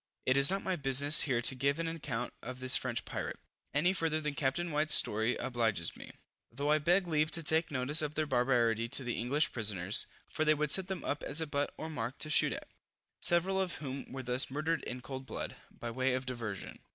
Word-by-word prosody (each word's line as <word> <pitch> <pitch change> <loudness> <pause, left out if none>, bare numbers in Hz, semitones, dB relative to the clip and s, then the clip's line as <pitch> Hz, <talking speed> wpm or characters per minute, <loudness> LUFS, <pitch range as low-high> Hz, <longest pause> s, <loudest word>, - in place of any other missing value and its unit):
It 130 - +2
is 140 0 +8
not 195 +1 -2
my 185 - -1
business 140 0 +4
here 120 -2 0
to 130 - +7
give 140 +2 -1
an 165 0 -3
account 145 -7 -5
of 125 +2 -8
this 130 0 +4
French 125 -2 0
pirate, - - -5 0.3
any 175 +6 +1
farther 165 -3 -1
than 150 -1 -4
Capt. 135 0 -1
White's 155 -3 +5
story 110 +3 +3
obliges 110 -9 -1
me, - - -11 0.4
though 140 +5 -2
I 155 - +3
beg 180 +5 +2
leave 155 -2 0
to 165 0 -4
take 160 +2 +1
notice 145 +3 +2
of 150 0 -4
their 155 - -1
barbarity 120 -4 +1
to 135 +2 +3
the 120 -1 -3
English 140 +6 +2
prisoners, 105 -4 0 0.2
for 155 - -2
they 155 0 +3
would 150 -1 -1
set 190 +2 +5
them 190 -1 -5
up 145 - -3
as 145 +3 +2
a 160 - -1
butt 145 -1 -2
or 160 - -6
mark 125 -5 -5
to 155 - -4
shoot - - +4
at; - - -8 0.5
several 190 +3 +2
of 185 -2 -3
whom 135 -2 -7
were 130 0 -6
thus 125 +1 +2
murdered 155 +2 -2
in 125 +1 -6
cold 130 0 -8
blood, - - -6 0.2
by 120 - -7
way 130 +2 -1
of 130 0 -4
diversion. 115 -7 -6
140 Hz, 225 wpm, -31 LUFS, 125-155 Hz, 0.5 s, is